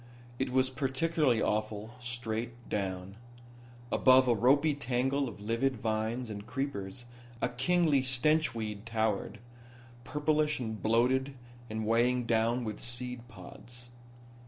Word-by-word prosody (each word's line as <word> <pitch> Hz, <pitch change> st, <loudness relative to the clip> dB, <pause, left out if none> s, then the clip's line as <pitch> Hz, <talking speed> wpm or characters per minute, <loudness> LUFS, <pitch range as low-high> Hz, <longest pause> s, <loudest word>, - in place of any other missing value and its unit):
It 130 Hz, 0 st, 0 dB
was 130 Hz, +1 st, +2 dB
particularly 135 Hz, -1 st, +1 dB
awful 110 Hz, +1 st, -2 dB
straight 120 Hz, 0 st, -4 dB
down. 95 Hz, -1 st, -3 dB, 0.7 s
Above 130 Hz, 0 st, +6 dB
a 120 Hz, -, +5 dB
ropy 140 Hz, +7 st, +4 dB
tangle 135 Hz, 0 st, 0 dB
of 105 Hz, -, -11 dB
livid 115 Hz, +6 st, 0 dB
vines 110 Hz, +2 st, -2 dB
and 105 Hz, +1 st, -7 dB
creepers 120 Hz, -3 st, -4 dB, 0.3 s
a -, -, 0 dB
kingly 150 Hz, +3 st, +2 dB
stench 130 Hz, +3 st, +2 dB
weed 105 Hz, -1 st, -5 dB
towered, 110 Hz, -1 st, -1 dB, 0.7 s
purplish 150 Hz, +2 st, +1 dB
and 110 Hz, -3 st, -4 dB
bloated 130 Hz, +5 st, +2 dB, 0.3 s
and 110 Hz, 0 st, -3 dB
weighted 120 Hz, +2 st, +2 dB
down 115 Hz, +2 st, +1 dB
with 110 Hz, -2 st, -4 dB
seed 120 Hz, 0 st, -3 dB
pods. 120 Hz, +5 st, -12 dB
120 Hz, 120 wpm, -31 LUFS, 110-130 Hz, 0.7 s, Above